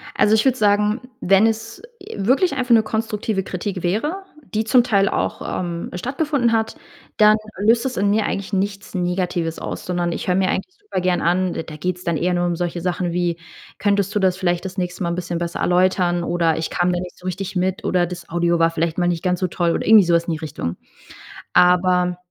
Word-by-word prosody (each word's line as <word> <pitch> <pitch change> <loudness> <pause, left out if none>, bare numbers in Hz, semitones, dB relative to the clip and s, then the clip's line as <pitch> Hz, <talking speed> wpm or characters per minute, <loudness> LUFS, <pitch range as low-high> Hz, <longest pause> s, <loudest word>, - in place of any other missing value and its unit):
Also, 215 +1 +4
ich 220 - +2
würde 260 -1 +3
sagen, 210 +1 +2 0.2
wenn 195 +4 +4
es, 225 0 -4 0.2
äh, - - -9
wirklich 260 - +2
einfach 255 -2 -2
'ne 225 -1 +6
konstruktive 215 -2 -2
Kritik 185 0 -4
wäre, 295 - -1 0.3
die 215 +1 +1
zum 245 +2 +5
Teil 200 -5 +2
auch, - - -2 0.2
ähm, 170 -1 -4
stattgefunden 260 - 0
hat, 225 -1 0 0.4
dann 215 0 +6 0.2
löst 230 +5 +3
das 260 - -3
in 200 +1 +2
mir 210 0 +2
eigentlich 195 +1 -4
nichts 195 0 -2
Negatives 180 -2 -1
aus, - - -6
sondern 175 -1 -1
ich - - -5
höre 180 - +2
mir 190 0 +2
eigentlich 370 - -3
super 410 - -4
gern 180 0 +1
an. 180 +1 +1
D - - -4
da 155 - -9
geht's 180 +3 -3
dann 170 -2 0
eher 180 +3 0
nur 175 0 +1
um 175 -1 0
solche 175 0 -3
Sachen 180 0 -1
wie: 175 -1 -1 0.4
„Könntest 200 -1 +1
du 210 - +1
das 185 -2 +2
vielleicht 175 -1 -1
das 190 +1 -6
nächste 180 +1 -3
Mal 170 - 0
'n 170 - -2
bisschen 175 -1 -3
besser 170 0 -4
erläutern, 180 -1 +2
oder 170 -2 +1
ich 160 - -2
kam 175 0 +1
da 175 - -1
nicht 180 0 -8
so 180 - -16
richtig 190 +1 -4
mit, 185 +1 -1
oder 180 -1 +2
das 175 -1 -8
Audio 170 0 +1
war 165 0 +4
vielleicht 165 +1 -2
mal 175 - +2
nicht 170 -2 -1
ganz 180 -1 0
so 185 - 0
toll“ 170 -1 0
oder - - -2
irgendwie 215 -3 +8
sowas 170 -1 +2
in 170 - -2
die - - -3
Richtung. 145 - -4 0.8
Aber 180 0 +3
180 Hz, 225 wpm, -21 LUFS, 175-210 Hz, 0.8 s, irgendwie